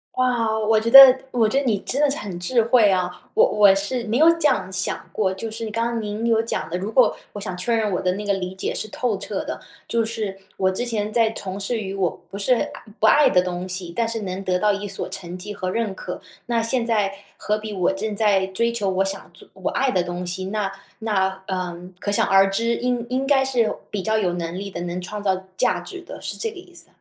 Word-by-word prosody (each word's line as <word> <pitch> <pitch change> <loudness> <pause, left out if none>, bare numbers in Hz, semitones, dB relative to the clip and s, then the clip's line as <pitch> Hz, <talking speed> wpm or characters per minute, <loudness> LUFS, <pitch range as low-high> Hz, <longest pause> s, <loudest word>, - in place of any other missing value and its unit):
哇， 240 -3 +1
我 220 0 +3
觉 225 - -1
得 270 +1 +12 0.2
我 230 -3 +3
觉 265 +6 +2
得 280 - -3
你 225 -5 +2
真 275 +7 -2
的 295 - +4
是 275 - 0
很 190 -4 -6
智 230 +7 +2
慧 230 -2 +5
啊。 185 -2 +1 0.2
我 - - +6
我 205 -2 +5
是 230 +5 -2
没 225 +3 0
有 320 +3 +7
这 315 - +3
样 190 -9 0
想 185 0 -2
过， 190 -3 0
就 220 +4 -6
是 220 0 -5
刚 230 +2 0
刚 235 -1 -2
您 210 +2 -4
有 225 -1 +3
讲 230 - -3
的， 175 - -2
如 195 +3 -4
果 250 +3 +3 0.2
我 205 - -6
想 185 -3 -4
确 230 +6 0
认 215 -3 0
我 180 - -1
的 180 -1 +1
那 205 +2 -5
个 205 - +1
理 185 0 -5
解 - - -3
是 215 - -4
透 220 -1 -2
彻 - - -4
的。 - - -5 0.3
就 230 -1 +1
是 215 -4 -4 0.2
我 190 0 +1
之 240 +6 -2
前 215 -3 -2
在 225 -1 +3
从 195 -2 -5
事 215 +4 -2
于 195 -1 -5
我 190 -3 +1 0.2
不 200 - -6
是 205 +5 +2
爱 240 - 0 0.3
不 220 - +3
爱 290 +6 +6
的 180 - +4
东 180 0 -4
西， 180 -2 -5
但 230 +4 0
是 225 -1 -3
能 190 -1 -4
得 180 -1 +1
到 210 +3 +3
一 205 0 -3
所 195 - -4
成 180 -1 -6
绩 205 +3 -7
和 185 -2 -3
认 215 0 -1
可。 180 -1 -7 0.2
那 235 -1 0
现 230 +1 0
在， 210 -4 +1 0.2
何 210 - -1
必 215 -1 -6
我 185 -1 +1
正 210 +2 -3
在 200 -3 +2
追 230 +5 0
求 210 -4 -1
我 190 0 +1
想 195 -1 -5
做 175 - -9
我 190 -1 -3
爱 265 -1 +1
的 185 - +2
东 175 0 -4
西， 185 +2 -3
那 200 0 -2 0.3
那， 190 -3 -1
呃， 185 -2 -3 0.2
可 - - -3
想 205 - +3
而 195 0 +5
知， 230 +4 0
应 245 -1 -1
应 260 +2 -1
该 270 -2 +4
是 245 -5 +1 0.2
比 205 - -2
较 220 +3 +1
有 185 -5 +1
能 170 0 -4
力 200 +1 -5
的， - - -6
能 175 +1 -4
创 210 +3 -6
造 190 -2 0
价 180 -1 +1
值 365 - -9
的， - - -9
是 - - -5
这 450 - -2
个 425 - -15
意 360 0 -13
思。 - - -10
205 Hz, 275 characters per minute, -22 LUFS, 190-230 Hz, 0.3 s, 得